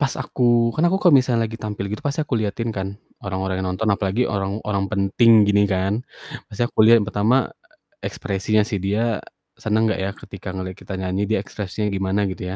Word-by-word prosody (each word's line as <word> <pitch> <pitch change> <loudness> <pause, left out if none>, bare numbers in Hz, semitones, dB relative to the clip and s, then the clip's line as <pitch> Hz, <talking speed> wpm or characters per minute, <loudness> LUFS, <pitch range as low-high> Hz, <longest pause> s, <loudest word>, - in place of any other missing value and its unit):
Pas 140 -2 +1
aku 120 -2 +2
kan 160 - +2
aku 190 - +2
kalau 175 -7 +5
misalnya 120 -3 +1
lagi 115 - -7
tampil 105 -3 -5
gitu 105 +8 -5
pasti 145 +2 -1
aku 145 -5 -1
liatin 110 +2 -2
kan 95 0 -2 0.4
orang-orang 95 -1 -2
yang - - -1
nonton 110 +4 -2
apalagi 100 +4 +1
orang-orang 100 0 -2
penting 100 +3 +3 0.2
gini 100 0 +4
kan, 100 +4 -1 0.5
pasti 110 - -2
aku 110 - +3
liat 115 0 +7
yang 105 - -2
pertama 110 +6 +2 0.6
ekspresinya 105 +2 0
sih, 105 - -3
dia 105 +2 0 0.4
seneng 110 +1 +1
gak 105 - -1
ya 100 - -1
ketika 100 0 -10
ngeliat 95 -1 -5
kita 95 - -8
nyanyi 95 +1 -1
dia 110 - +2
ekspresinya 105 0 -4
gimana 100 0 0
gitu 95 - -7
105 Hz, 190 wpm, -22 LUFS, 95-115 Hz, 0.6 s, liat